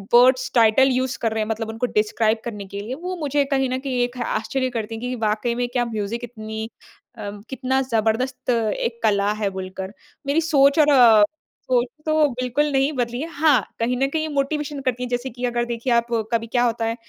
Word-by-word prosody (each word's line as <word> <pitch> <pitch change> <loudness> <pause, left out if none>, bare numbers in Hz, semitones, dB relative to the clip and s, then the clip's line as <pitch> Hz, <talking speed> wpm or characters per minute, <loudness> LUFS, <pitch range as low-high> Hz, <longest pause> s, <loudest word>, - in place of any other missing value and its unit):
Words 255 +1 +5
title 235 +4 +5
use 255 0 -1
कर 225 -1 +1
रहे 220 -1 0
हैं 215 - -6
मतलब 220 0 -2
उनको 225 +3 -2
डिस्क्राइब 220 +1 +1
करने 210 -4 -5
के 200 - -3
लिए, 230 +5 -5
वो 360 +4 -5
मुझे 290 -2 0
कहीं 270 -1 +1
न 255 +1 -1
कहीं 260 -2 -3
एक 245 +1 -4
आश्चर्य 255 +4 -1
करती 225 0 -4
है 225 - -8
कि 250 +1 -3
वाक़ई 215 +3 0
में 245 0 -1
क्या 245 -1 +1
म्यूज़िक 225 +1 -4
इतनी 220 -1 -6 0.5
अ, 205 -2 -5 0.2
कितना 265 0 0
ज़बरदस्त 225 +4 0
एक 230 0 -1
कला 205 -1 +2
है 200 - +2
बोलकर। 190 +1 -6 0.3
मेरी 295 +4 +2
सोच 285 -2 +4
और 300 - +5
अ, 230 -5 +7 0.4
सोच 250 -1 +2 0.2
तो 310 -1 +3
बिल्कुल 255 +4 -1
नहीं 270 +2 +2
बदली 245 0 -2
है। 320 - -3
हाँ, 290 -6 +4 0.2
कहीं 245 +2 0
न 270 +1 +2
कहीं 315 -1 0
मोटिवेशन 290 +1 -1
करती 250 -1 -1
है 250 - -4
जैसे 245 +2 -2
कि 250 +1 -4
अगर 240 0 0
देखिए 240 +1 -1
आप, 235 0 +2 0.3
कभी 230 0 0
क्या 245 +1 +1
होता 230 -1 0
है 225 +1 -1
245 Hz, 210 wpm, -22 LUFS, 225-265 Hz, 0.5 s, अ